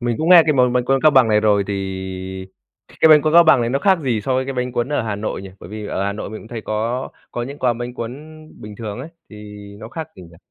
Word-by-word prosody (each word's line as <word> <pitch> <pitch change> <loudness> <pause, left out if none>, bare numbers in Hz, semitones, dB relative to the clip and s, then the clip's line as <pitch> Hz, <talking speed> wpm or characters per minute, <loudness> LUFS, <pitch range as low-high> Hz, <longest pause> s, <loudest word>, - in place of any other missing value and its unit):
Mình 120 -2 -1
cũng 160 - -1
nghe 175 -2 +9
cái 155 - +3
món 125 -2 +3
bánh 125 -1 +1
cuốn 135 +1 +1
Cao 155 - +6
Bằng 130 -5 +4
này 105 -1 +3
rồi, 105 -2 +2
thì 100 - -3 1.3
cái 160 - +6
bánh 150 -2 +7
cuốn 155 - 0
Cao 170 0 +7
Bằng 140 -5 +5
này 120 0 -1
nó 135 - 0
khác 190 +2 +3
gì 125 -7 -1
so 130 +5 -2
với 130 0 0
cái 135 - -4
bánh 125 0 -3
cuốn 120 +2 -1
ở 130 - 0
Hà 105 -2 -3
Nội 105 -2 -4
nhỉ? 95 - -9
Bởi - - -11
vì 105 -1 -6
ở 95 - -3
Hà 100 - -1
Nội 105 - -7
mình 110 - -8
cũng 110 - -14
thấy 115 -2 -6
có 115 +4 -3 0.2
có 120 - -4
những 140 +4 -7
quán 120 -2 0
bánh 120 0 -6
cuốn 115 0 -5 0.5
bình 105 0 -9
thường 110 0 -6
ấy, 140 - -8 0.2
thì 105 - -11 0.4
nó 110 +2 -10
khác 160 +2 -7
gì - - -11
nhỉ? 85 -1 -15
120 Hz, 295 wpm, -19 LUFS, 110-135 Hz, 1.3 s, nghe